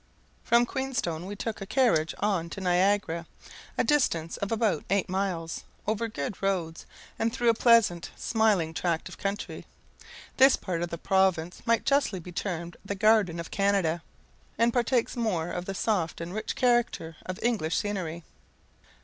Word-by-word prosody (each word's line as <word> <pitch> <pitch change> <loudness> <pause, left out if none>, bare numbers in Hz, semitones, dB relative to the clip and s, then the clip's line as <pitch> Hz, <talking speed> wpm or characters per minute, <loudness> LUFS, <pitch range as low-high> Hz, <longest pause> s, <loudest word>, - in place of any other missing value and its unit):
From 235 +1 +4
Queenstone 240 - -3
we 205 - -5
took 215 +1 -4
a 195 - -5
carriage 190 - +2
on 190 -5 0
to 195 - -7
Niagara, 180 -2 +1 0.5
a - - +3
distance 170 - +1
of 200 - -3
about 220 -8 +1
eight 195 0 +1
miles, 180 -4 -2 0.2
over 220 +2 0
good 180 -3 -5
roads, 180 -5 -2 0.3
and 225 +1 +1
through 240 -1 +1
a - - +6
pleasant, 225 -7 +4
smiling 210 -8 +1
tract 165 -1 -1
of - - -12
country. 200 +1 -4 0.7
This 265 +1 +7
part 175 -3 -3
of 175 - -2
the 170 - -5
province 185 -2 +1
might 230 -1 +2
justly 275 -9 +2
be 175 +1 -10
termed 170 -2 -4
the 200 0 -4
garden 205 -4 +3
of 170 - -6
Canada, 195 -5 +1 0.6
and 230 0 +3
partakes 245 0 +1
more 195 -9 -1
of 180 0 -4
the 195 - -4
soft 185 -6 0
and 170 +2 -6
rich 215 - -3
character 240 -10 +1
of 185 0 -4
English 220 -9 +1
scenery. 175 -5 -3
195 Hz, 160 wpm, -28 LUFS, 170-225 Hz, 0.7 s, This